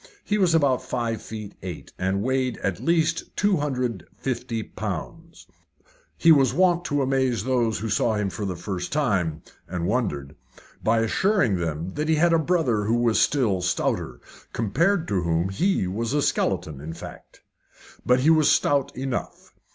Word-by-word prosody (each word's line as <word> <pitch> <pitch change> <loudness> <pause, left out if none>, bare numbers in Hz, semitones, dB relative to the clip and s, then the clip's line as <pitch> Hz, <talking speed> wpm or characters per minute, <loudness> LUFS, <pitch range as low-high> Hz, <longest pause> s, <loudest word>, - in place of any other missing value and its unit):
He 210 0 0
was 175 -4 +3
about 140 -5 +3
five 115 -3 -3
feet 110 -2 -8
eight, 90 -3 -8
and 95 +2 0
weighed 130 0 0
at 95 -3 -1
least 165 0 0
250 125 - -1
pounds. 160 - -7 0.7
He 165 - +5
was 135 -5 +4
wont 175 -1 +3
to 145 -1 0
amaze 130 -5 +1
those 120 -4 +1
who 110 - -4
saw 110 +2 +1
him 105 -2 -1
for 105 - -5
the 95 -2 -2
first 90 0 -5
time 95 - 0 0.2
and 90 -1 -3
wondered 80 - -2 0.5
by 115 +1 +3
assuring 125 - +2
them 85 +1 -3
that 150 +1 -2
he 160 - +4
had 170 +2 +3
a 165 - +4
brother 150 - +1
who 115 +3 +2
was 120 -3 +2
still 110 -11 +2
stouter 90 -8 -1 0.3
compared 160 - +1
to 100 -3 +1
whom 85 +1 0
he 180 - +1
was 110 +7 -2
a 145 -1 +2
skeleton, 75 -4 -1
in 80 +2 -6
fact. - - -11 0.6
But 125 +1 +3
he 155 +5 +5
was 155 -2 +4
stout 140 -3 +2
enough. 130 -1 -5
120 Hz, 160 wpm, -24 LUFS, 95-150 Hz, 0.7 s, He